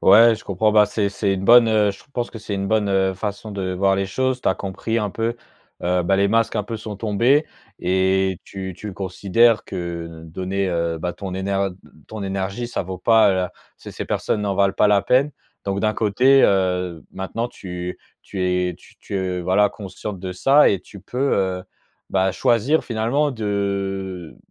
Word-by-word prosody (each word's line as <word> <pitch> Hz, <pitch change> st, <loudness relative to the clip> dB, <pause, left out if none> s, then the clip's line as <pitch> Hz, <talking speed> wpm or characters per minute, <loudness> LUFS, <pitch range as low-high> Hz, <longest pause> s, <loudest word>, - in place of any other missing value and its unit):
Ouais 115 Hz, +4 st, +7 dB
je 110 Hz, -, -11 dB
comprends, 105 Hz, +3 st, +1 dB
bah 105 Hz, 0 st, +6 dB
c'est 105 Hz, 0 st, 0 dB
c'est 100 Hz, 0 st, -1 dB
une 95 Hz, 0 st, -3 dB
bonne, 120 Hz, +1 st, +7 dB
heu, 105 Hz, -2 st, +3 dB
je -, -, -15 dB
pense 120 Hz, -1 st, -2 dB
que 115 Hz, -, -8 dB
c'est 105 Hz, 0 st, -4 dB
une 100 Hz, 0 st, -2 dB
bonne, 105 Hz, 0 st, +1 dB
heu, 95 Hz, -1 st, +2 dB
façon 105 Hz, +2 st, -5 dB
de 95 Hz, -2 st, -3 dB
voir 95 Hz, +1 st, +2 dB
les 95 Hz, 0 st, -1 dB
choses, 130 Hz, +5 st, -1 dB
tu -, -, +1 dB
as 95 Hz, -, +2 dB
compris 105 Hz, +4 st, -3 dB
un 105 Hz, -2 st, -1 dB
peu, 115 Hz, +3 st, -2 dB, 0.5 s
heu, 90 Hz, 0 st, +1 dB
bah, 95 Hz, +3 st, +2 dB
les 100 Hz, +1 st, +3 dB
masques 115 Hz, +2 st, +1 dB
un 105 Hz, -, -1 dB
peu 115 Hz, +2 st, -5 dB
sont 105 Hz, -1 st, -7 dB
tombés 115 Hz, +8 st, +2 dB, 0.3 s
et 95 Hz, 0 st, +1 dB
tu 95 Hz, -1 st, -7 dB
tu 105 Hz, -, -7 dB
le -, -, -6 dB
considères 100 Hz, +4 st, +2 dB
que 85 Hz, -2 st, -5 dB, 0.2 s
l -, -, -12 dB
donner, 95 Hz, +2 st, -2 dB
heu, 85 Hz, -1 st, -1 dB
bah, 90 Hz, +2 st, -3 dB
ton 95 Hz, -2 st, -6 dB
énerd 95 Hz, 0 st, -1 dB
d -, -, -18 dB, 0.2 s
ton 110 Hz, -2 st, -6 dB
énergie, 95 Hz, +4 st, -3 dB
ça 120 Hz, -, -3 dB
vaut 95 Hz, 0 st, -6 dB
pas 110 Hz, +1 st, +5 dB
la 95 Hz, -1 st, -1 dB, 0.2 s
ces -, -, -11 dB
ces -, -, -5 dB
personnes 105 Hz, -, -1 dB
n'en 100 Hz, -2 st, -1 dB
valent 100 Hz, -1 st, +3 dB
pas 105 Hz, -, +3 dB
la 100 Hz, -1 st, +4 dB
peine, 130 Hz, +7 st, +3 dB, 0.3 s
donc 100 Hz, 0 st, -1 dB
d'un 110 Hz, +1 st, +1 dB
côté, 125 Hz, +6 st, +4 dB
heu, 90 Hz, -3 st, +1 dB
maintenant 95 Hz, +5 st, -3 dB
tu 90 Hz, -6 st, -6 dB, 0.3 s
tu 95 Hz, -2 st, -5 dB
es, 90 Hz, -1 st, 0 dB
tu -, -, -20 dB
tu 95 Hz, -2 st, -3 dB
voilà 95 Hz, +3 st, +3 dB
consciente 100 Hz, 0 st, -7 dB
de 95 Hz, 0 st, -5 dB
ça 135 Hz, +10 st, +5 dB
et 100 Hz, -, 0 dB
tu 100 Hz, -, -13 dB
peux, 130 Hz, +8 st, -1 dB
heu, 95 Hz, -1 st, -1 dB, 0.5 s
bah, 95 Hz, 0 st, +2 dB
choisir 125 Hz, -, +2 dB
finalement 120 Hz, +6 st, 0 dB
de 100 Hz, -, -3 dB
100 Hz, 205 wpm, -22 LUFS, 95-110 Hz, 0.5 s, Ouais